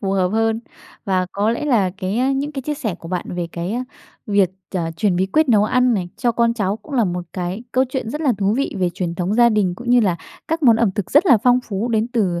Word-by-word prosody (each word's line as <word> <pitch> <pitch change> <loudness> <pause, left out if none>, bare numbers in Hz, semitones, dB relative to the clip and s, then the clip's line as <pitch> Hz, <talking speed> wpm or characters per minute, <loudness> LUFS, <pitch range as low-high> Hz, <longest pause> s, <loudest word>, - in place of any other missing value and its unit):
phù 195 -2 -1
hợp 185 -2 +2
hơn. 225 +2 0 0.4
Và 185 -2 0
có 205 +2 +1
lẽ 235 +6 -2
là 225 -10 +2
cái 235 +9 0
những 285 +2 -2
cái 270 -3 -5
chia 295 +2 -2
sẻ 225 - -3
của 165 - -10
bạn 180 -1 -2
về 175 -1 -2
cái 190 +9 -3 0.4
việc, 200 -4 +2 0.2
ờ, 165 -2 -1
truyền 190 -1 +1
bí 185 +2 +1
quyết 310 +8 +2
nấu 210 -3 +4
ăn 250 +1 +2
này 180 -3 -2
cho 240 -2 +1
con 235 0 +2
cháu 200 -2 -1
cũng 280 +5 -10
là 235 -4 +3
một 180 -1 -3
cái 185 +4 -4
câu 260 +1 +3
chuyện 255 -3 -4
rất 300 - -4
là 275 -6 +2
thú 200 +2 +1
vị 275 - -1
về 180 -2 +1
truyền 175 -2 -3
thống 180 +4 -1
gia 240 0 +6
đình, 200 -5 +1
cũng 240 +3 -5
như 245 0 +6
là 190 -6 +1 0.3
các 325 0 -1
món 235 -4 +6
ẩm 225 -3 +2
thực 200 -2 -4
rất 295 +7 +4
là 250 -9 +6
phong 250 0 +4
phú 205 +3 -2
đến 225 0 0
từ, 195 -8 0
220 Hz, 265 wpm, -20 LUFS, 185-245 Hz, 0.4 s, gia